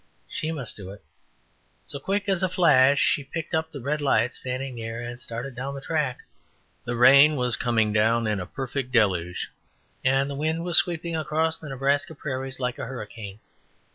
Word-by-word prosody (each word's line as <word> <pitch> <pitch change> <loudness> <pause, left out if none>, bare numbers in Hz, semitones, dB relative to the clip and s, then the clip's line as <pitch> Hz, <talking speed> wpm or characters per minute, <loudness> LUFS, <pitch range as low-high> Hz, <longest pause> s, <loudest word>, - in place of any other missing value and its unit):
She 155 - -3
must 140 -8 -3
do 95 -3 -8
it. 100 +1 -11 0.8
So, 140 - -5
quick 200 +7 -1
as 190 -3 +2
a 185 - +2
flash 140 -6 +5
she 150 -5 +2
picked 165 +4 -6
up 160 0 0
the 145 - -8
red 150 +4 -1
light 125 -4 +2
standing 130 +1 -4
near, 115 -1 -5
and 120 +1 -6
started 125 +2 -5
down 135 +3 -5
the - - -5
track. 150 -4 -2 0.6
The 120 0 -2
rain 140 +5 +7
was 125 -3 +1
coming 115 -3 +1
down 115 +2 +3
in 105 -2 0
a 90 - -5
perfect 135 -1 -4
deluge, 90 -7 +1 0.5
and 135 +1 +3
the 140 - -4
wind 160 +4 -1
was 175 -1 +3
sweeping 170 -1 -2
across 160 +1 0
the 155 - -9
Nebraska 140 +3 0
prairies 135 -2 -5
like 125 -1 -2
a - - -4
hurricane. 105 -4 -8
135 Hz, 185 wpm, -25 LUFS, 120-150 Hz, 0.8 s, rain